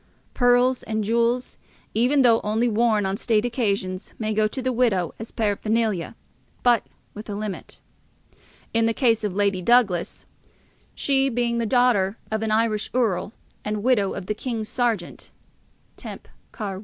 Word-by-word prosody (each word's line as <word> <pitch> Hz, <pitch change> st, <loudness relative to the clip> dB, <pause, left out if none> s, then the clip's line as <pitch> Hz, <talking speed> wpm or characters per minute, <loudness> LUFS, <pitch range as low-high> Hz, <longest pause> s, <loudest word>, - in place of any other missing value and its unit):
Pearls 245 Hz, +1 st, +3 dB
and 220 Hz, -1 st, -2 dB
jewels, 235 Hz, +3 st, 0 dB, 0.3 s
even 260 Hz, +5 st, +3 dB
though 230 Hz, -2 st, +5 dB
only 220 Hz, +3 st, +1 dB
worn 220 Hz, -2 st, +2 dB
on 190 Hz, +1 st, -1 dB
state 220 Hz, -1 st, +1 dB
occasions, 200 Hz, -6 st, -2 dB
may 215 Hz, -1 st, -2 dB
go 215 Hz, 0 st, +2 dB
to 240 Hz, -, -5 dB
the 255 Hz, 0 st, -1 dB
widow 215 Hz, -9 st, +1 dB
as 225 Hz, -, -7 dB
paraphernalia, 215 Hz, -2 st, -1 dB, 0.5 s
but 240 Hz, -2 st, +3 dB, 0.3 s
with 210 Hz, +1 st, -9 dB
a 205 Hz, -, -3 dB
limit. 205 Hz, -2 st, -6 dB, 0.9 s
In 225 Hz, 0 st, +3 dB
the 225 Hz, -, 0 dB
case 230 Hz, -4 st, +2 dB
of 205 Hz, -3 st, -2 dB
Lady 200 Hz, -2 st, +1 dB
Douglas, 205 Hz, -5 st, +2 dB, 0.7 s
she 270 Hz, -1 st, +2 dB
being 235 Hz, -1 st, 0 dB
the 230 Hz, -, -1 dB
daughter 230 Hz, -5 st, +2 dB
of 220 Hz, 0 st, -1 dB
an 220 Hz, -, -1 dB
Irish 215 Hz, -1 st, +1 dB
Earl 210 Hz, -5 st, 0 dB, 0.3 s
and 210 Hz, 0 st, -3 dB
widow 225 Hz, -6 st, +2 dB
of 195 Hz, -, -6 dB
the 210 Hz, -, -1 dB
King's 220 Hz, -1 st, -4 dB
Sergeant 230 Hz, -8 st, -2 dB, 0.7 s
(temp. -, -, -9 dB, 0.2 s
Car. 200 Hz, -4 st, -5 dB
I.) -, -, -7 dB
220 Hz, 155 wpm, -23 LUFS, 205-240 Hz, 0.9 s, though